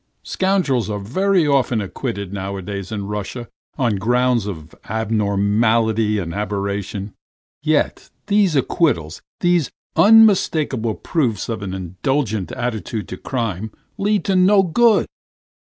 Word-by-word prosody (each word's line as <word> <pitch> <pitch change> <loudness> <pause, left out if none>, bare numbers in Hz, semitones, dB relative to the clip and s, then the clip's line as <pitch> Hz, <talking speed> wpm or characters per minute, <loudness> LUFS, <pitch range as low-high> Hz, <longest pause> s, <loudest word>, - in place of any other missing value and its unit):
Scoundrels 175 - 0
are 105 - -2
very 180 - +1
often 135 -5 +2
acquitted 100 -1 -4
nowadays 100 0 -5
in 100 -2 -3
Russia 105 +4 -5 0.3
on 120 -7 +1
grounds 120 +1 +1
of 80 -5 -7
abnormality 110 +1 +1
and 85 -4 -3
aberration, 100 0 -3 0.5
yet 155 0 0 0.2
these 200 -5 +2
acquittals, 130 - 0 0.2
these 175 -4 +2 0.3
unmistakable 165 - +4
proofs 120 - -1
of 115 -2 -3
an 95 -2 -4
indulgent 100 - -2
attitude 110 -3 -3
to 90 - -6
crime, 110 -4 -3 0.3
lead 205 +1 +1
to 195 - +1
no 190 +2 +5
good. 220 +5 +3
110 Hz, 115 wpm, -20 LUFS, 100-150 Hz, 0.5 s, no